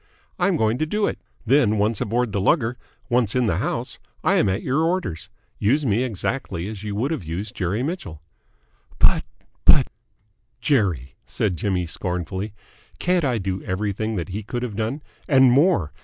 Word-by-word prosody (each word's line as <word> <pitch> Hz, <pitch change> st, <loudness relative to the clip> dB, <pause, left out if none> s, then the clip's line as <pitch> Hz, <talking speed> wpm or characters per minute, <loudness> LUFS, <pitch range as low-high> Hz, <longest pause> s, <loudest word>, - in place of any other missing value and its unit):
I'm -, -, +2 dB
going 110 Hz, +2 st, +1 dB
to 155 Hz, -, 0 dB
do 210 Hz, +5 st, +1 dB
it. -, -, -2 dB, 0.3 s
Then, 115 Hz, -3 st, +4 dB
once 105 Hz, +1 st, +1 dB
aboard 120 Hz, +1 st, 0 dB
the 100 Hz, -, -1 dB
lugger 120 Hz, -, +2 dB, 0.3 s
once 120 Hz, -3 st, +2 dB
in 125 Hz, -1 st, +3 dB
the 110 Hz, -, +1 dB
house, -, -, -2 dB, 0.2 s
I -, -, +3 dB
am -, -, +3 dB
at 95 Hz, +3 st, -1 dB
your 135 Hz, +5 st, +1 dB
orders. 165 Hz, -, -1 dB, 0.3 s
Use 140 Hz, +8 st, +2 dB
me 110 Hz, 0 st, +2 dB
exactly 105 Hz, -5 st, -2 dB
as 105 Hz, -2 st, -7 dB
you 105 Hz, -1 st, -3 dB
would 125 Hz, +9 st, 0 dB
have 160 Hz, -, -2 dB
used 90 Hz, +6 st, -4 dB
Jerry 100 Hz, +6 st, -1 dB
Mitchell." 150 Hz, -, -4 dB, 0.8 s
"But -, -, +4 dB, 0.4 s
but -, -, +6 dB, 0.4 s
!" 110 Hz, +2 st, -45 dB
"Jerry!" 95 Hz, -, +1 dB
said 95 Hz, -4 st, 0 dB
Jimmy 90 Hz, +1 st, -1 dB
scornfully. 90 Hz, +4 st, -3 dB, 0.5 s
"Can't 180 Hz, -1 st, +1 dB
I 130 Hz, -4 st, +1 dB
do 95 Hz, -2 st, -3 dB
everything 105 Hz, +3 st, -2 dB
that 90 Hz, -2 st, -3 dB
he 100 Hz, +3 st, -4 dB
could 120 Hz, +4 st, -4 dB
have 115 Hz, -5 st, -4 dB
done? 115 Hz, +8 st, -2 dB, 0.3 s
And 130 Hz, -3 st, +6 dB
more. 135 Hz, -, +3 dB
110 Hz, 175 wpm, -23 LUFS, 95-130 Hz, 0.8 s, but